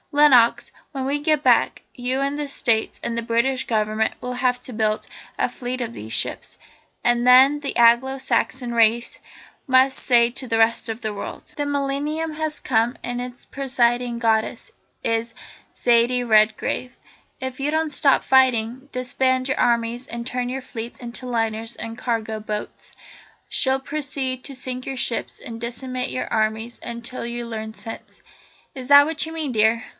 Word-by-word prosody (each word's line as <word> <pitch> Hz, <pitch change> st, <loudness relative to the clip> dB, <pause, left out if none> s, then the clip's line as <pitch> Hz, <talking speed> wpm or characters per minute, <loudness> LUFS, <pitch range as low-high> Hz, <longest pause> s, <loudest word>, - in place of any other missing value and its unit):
Lenox, 270 Hz, -6 st, +5 dB, 0.2 s
when 270 Hz, -3 st, -4 dB
we 285 Hz, +2 st, -1 dB
get 300 Hz, -1 st, +1 dB
back, -, -, +3 dB
you 255 Hz, +2 st, -2 dB
and 280 Hz, +1 st, -1 dB
the 295 Hz, -1 st, -3 dB
States 230 Hz, -5 st, 0 dB
and 235 Hz, 0 st, -2 dB
the -, -, 0 dB
British 235 Hz, +3 st, 0 dB
Government 215 Hz, -1 st, 0 dB
will 250 Hz, 0 st, -4 dB
have 250 Hz, 0 st, 0 dB
to 255 Hz, -, -7 dB
build 215 Hz, -1 st, 0 dB, 0.3 s
a -, -, +2 dB
fleet 250 Hz, 0 st, -5 dB
of 235 Hz, -2 st, -4 dB
these 110 Hz, -, -8 dB
ships, -, -, -2 dB, 0.5 s
and 240 Hz, 0 st, +2 dB
then 260 Hz, +4 st, +7 dB
the 280 Hz, -, -2 dB
Anglo 240 Hz, +3 st, +5 dB
Saxon 250 Hz, -1 st, -1 dB
race 230 Hz, +1 st, +2 dB, 0.5 s
must 260 Hz, 0 st, +4 dB
say 235 Hz, -2 st, +4 dB
to 260 Hz, +1 st, -6 dB
the 225 Hz, -, 0 dB
rest 225 Hz, +1 st, +2 dB
of 225 Hz, 0 st, -4 dB
the 215 Hz, -1 st, -3 dB
world 200 Hz, -, -7 dB
" -, -, -25 dB
"The 290 Hz, -, -2 dB
millennium 285 Hz, +3 st, -1 dB
has 310 Hz, 0 st, -3 dB
come 235 Hz, 0 st, +1 dB
and 245 Hz, 0 st, -3 dB
its 250 Hz, 0 st, -8 dB
presiding 245 Hz, -3 st, 0 dB
goddess 220 Hz, -1 st, 0 dB, 0.3 s
is 230 Hz, 0 st, -1 dB, 0.4 s
Zaidie 240 Hz, +1 st, +3 dB
Redgrave. 220 Hz, +3 st, +2 dB, 0.4 s
If 260 Hz, -1 st, -5 dB
you 285 Hz, +2 st, 0 dB
don't 315 Hz, -1 st, 0 dB
stop 280 Hz, -3 st, +3 dB
fighting, 260 Hz, 0 st, +2 dB
disband 255 Hz, +1 st, +1 dB
your 265 Hz, -, -1 dB
armies 235 Hz, +1 st, +1 dB
and 235 Hz, 0 st, -5 dB
turn 250 Hz, -1 st, -2 dB
your 265 Hz, +1 st, -4 dB
fleets 235 Hz, -1 st, -7 dB
into 240 Hz, +1 st, -7 dB
liners 225 Hz, -1 st, -2 dB
and 225 Hz, 0 st, -6 dB
cargo 225 Hz, -3 st, -2 dB
boats, 210 Hz, 0 st, -6 dB, 0.5 s
she'll 265 Hz, 0 st, +1 dB
proceed 270 Hz, -2 st, -3 dB
to 275 Hz, -, -5 dB
sink 255 Hz, 0 st, -3 dB
your 270 Hz, -, -4 dB
ships 240 Hz, -1 st, 0 dB
and 230 Hz, -1 st, -8 dB
decimate 250 Hz, +2 st, -3 dB
your 255 Hz, -, -3 dB
armies 220 Hz, +2 st, -1 dB
until 235 Hz, +1 st, -5 dB
you 240 Hz, 0 st, -4 dB
learn 220 Hz, -1 st, -6 dB
sense. 225 Hz, 0 st, -10 dB, 0.5 s
Is 255 Hz, -2 st, -7 dB
that 285 Hz, 0 st, +9 dB
what 320 Hz, 0 st, -2 dB
you 320 Hz, -, -7 dB
mean, 315 Hz, -4 st, -3 dB
dear?" 220 Hz, +2 st, +3 dB
245 Hz, 170 wpm, -22 LUFS, 230-265 Hz, 0.5 s, that